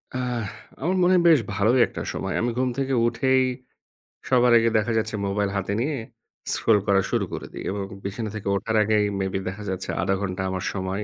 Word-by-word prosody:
আহ! 125 -2 -2 0.4
আমার 180 +5 +1
মনে 180 +1 +4
হয় 175 - +4
বেশ 155 -5 +6 0.2
ভালোই 110 +5 +3
একটা - - -7
সময়। - - -3
আমি 120 - +1
ঘুম 130 0 +1
থেকে 135 0 0
উঠেই, 130 +2 +2 0.9
সবার 125 -1 +4
আগে 115 0 +3
দেখা 110 +2 0
যাচ্ছে 110 0 -1
মোবাইল 100 0 0
হাতে 100 0 -2
নিয়ে, 145 +4 0 0.6
scroll 105 -2 +3
করা 100 -1 +4
শুরু - - +1
করে - - -5
দিই - - -6
এবং 100 +1 -3 0.2
বিছানা 105 +3 -4
থেকে 105 - -6
ওঠার 110 +3 -2
আগেই 105 0 +2 0.2
maybe 95 0 -1
দেখা 105 +3 -7
যাচ্ছে 95 0 -4
০.৫০ 95 +1 +1
ঘণ্টা 95 -1 -3
আমার 95 -1 -3
সময় 95 +1 -3
110 Hz, 195 wpm, -24 LUFS, 100-125 Hz, 0.9 s, বেশ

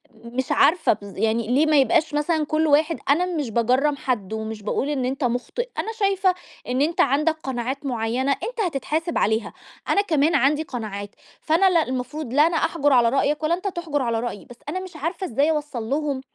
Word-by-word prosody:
مش 235 +3 -4
عارفة 330 -6 +4
بالض 200 -2 -11
يعني 225 +1 0
ليه 270 +6 +3
ما 310 -1 +3
يبقاش 290 +5 +2
مثلًا 305 +1 +1
كل 310 +1 +1
واحد 305 +3 +3
أنا 320 +6 +4
مش 310 -9 -3
باجَرّم 255 +6 +2
حد 230 -7 -3
ومش 220 -1 -5
باقول 265 +6 -1
إن 265 -4 -1
أنت 265 +2 -2
مُخطِئ، 250 - -2
أنا 450 - -2
شايفة 390 -3 +1 0.3
إن 255 +2 0
أنت 325 +3 +2
عندك 305 +4 +2
قناعات 265 +2 -3
معيّنة 245 +2 -1
أنت 465 - -3
هتتحاسِب 320 +2 -2
عليها. 220 +1 0 0.4
أنا 405 - +4
كمان 320 -4 +2
عندي 285 +3 +3
قناعات، 210 -7 -6 0.3
فأنا 335 +5 +3
لا 340 -3 +3
المفروض 255 +1 -4
لا 295 +4 +5
أنا 335 - 0
أحجُر 290 -4 +1
على 240 -2 +5
رأيك 290 +4 0
ولا 320 +2 +2
أنت 380 +3 -5
تحجُر 335 -6 -2
على 235 -2 0
رأيي، 235 -3 -5
بس 245 - -13
أنا 370 - -2
مش 370 -2 -9
عارفة 330 +5 -3
إزاي 280 +7 +2
أوَصَّل 295 -6 -3
لهم 285 -1 -1
285 Hz, 195 wpm, -23 LUFS, 245-320 Hz, 0.4 s, لا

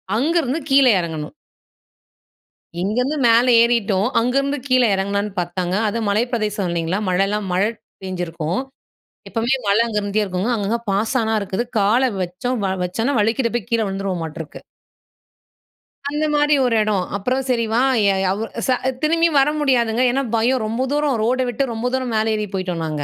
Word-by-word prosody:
அங்கிருந்து 305 +2 +1
கீழ 275 0 +6 0.2
இறங்கணும். 160 - -5 1.5
இங்கேருந்து 250 +10 0
மேல 230 +2 +5 0.2
ஏறிட்டோம், 220 -4 +2
அங்கேருந்து 275 +4 0
கீழே 255 -2 +4
எறங்குலான்னு 200 +1 -1
பார்த்தாங்க. 175 +1 -2
அதுவும் 220 0 -2
மலை 215 +4 +2
பிரதேசம் 210 -4 -1
இல்லைங்களா? 170 +3 -1
மழைலாம் 195 +2 0
மழை 200 +4 +2 0.3
பேஞ்சிருக்கும். 175 +1 -3 0.7
எப்போவுமே 235 +3 0
மழை 205 +3 +4
அங்கேருந்தே 210 -1 -1
இருக்குங்க. 190 +4 -2
அங்கங்க 215 +3 -1
பாசானா 220 +2 0
இருக்குது. 200 +4 -2 0.2
கால 215 +6 +3 0.2
வச்சோம் 185 +8 -3 0.3
வச்சோன்னா 225 +9 -1
வழிக்கிட்டே 230 +3 +1
போய் 240 +1 -3
கீழே 230 -1 +2
விழுந்துருவோம் 195 -3 -3
மாட்டுருக்கு. 160 -1 -8 1.5
அந்த 300 +1 -1
மாரி 295 0 +3
ஒரு 235 - +1
எடம். 210 -3 0
அப்புறம் 255 +7 -1
சரி 235 -2 +1
வா 230 - +2 0.3
ய 200 - +4
ய - - 0
அவ் 210 - -4 0.3
ச - - -3 0.3
திரும்பி 330 +2 +3
வர 275 +2 +4
முடியாதுங்க. 245 -4 +1
ஏன்னா 270 +2 0
பயம் 245 +2 +2
ரொம்ப 230 +4 -2
தூரம் 295 -3 +1
ரோடை 255 +3 +1
விட்டு 260 +4 -1
ரொம்ப 225 +2 -4
தூரம் 255 -2 -1
மேலே 220 0 +1
ஏறி 210 0 -2
போய்ட்டோம் 185 -3 -3
நாங்க. 150 -2 -3
220 Hz, 150 wpm, -20 LUFS, 195-255 Hz, 1.5 s, கீழ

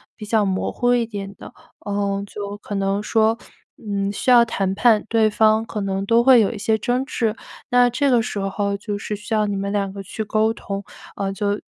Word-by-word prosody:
比 215 - -9
较 220 0 +2
模 190 -1 -1
糊 245 0 +1
一 240 -1 +1
点 200 -3 -7
的， - - -11 0.3
呃， 200 -1 -1
就 205 0 -7
可 205 - -8
能 195 +1 0
说， 220 +1 +2 0.4
嗯， 200 -2 -2
需 230 +5 0
要 240 -1 +8
谈 195 -4 -1
判 215 0 +3
对 225 -1 +3
方 215 +1 +3
可 220 - -5
能 195 0 -2
都 230 +2 +4
会 260 -1 +7
有 205 - +1
一 225 - -7
些 220 +2 +1
争 250 +4 0
执， 225 -4 -1 0.3
那 245 -1 +5
这 280 +3 +1
个 245 -3 +4
时 210 - -4
候 200 +1 -1
就 205 +1 -4
是 210 +1 -4
需 210 +2 -4
要 215 -1 +2
你 205 -1 -2
们 200 0 -3
2 200 -2 -1
个 200 - -7
去 205 +3 -5
沟 215 +1 +1
通， 200 -2 -5 0.3
呃， 195 -1 -2
就 205 +1 -2
210 Hz, 230 characters per minute, -21 LUFS, 200-225 Hz, 0.4 s, 要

